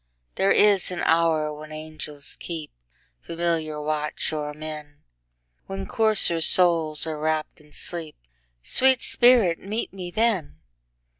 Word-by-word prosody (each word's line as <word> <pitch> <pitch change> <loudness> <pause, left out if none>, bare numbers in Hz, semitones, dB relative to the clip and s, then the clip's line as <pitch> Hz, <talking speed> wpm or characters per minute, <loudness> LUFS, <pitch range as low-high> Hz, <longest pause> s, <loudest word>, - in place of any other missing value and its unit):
There 195 - +1
is 205 -3 +4
an 180 -1 -4
hour 160 -2 +2
when 155 +1 -11
angels 155 -2 -6
keepFamiliar 155 - -5
watch 150 +1 -2
o'er 150 -1 -3
men, 150 -1 -9 0.6
When 95 0 -5
coarser 215 -7 +2
souls 165 -3 +4
are 155 -2 -5
wrapp'd 155 +1 -2
in 150 0 -22
sleep—Sweet - - -1
spirit, 235 -9 +4
meet 210 +3 -4
me 185 -2 -7
then! 195 - -1
155 Hz, 115 wpm, -24 LUFS, 150-175 Hz, 0.6 s, is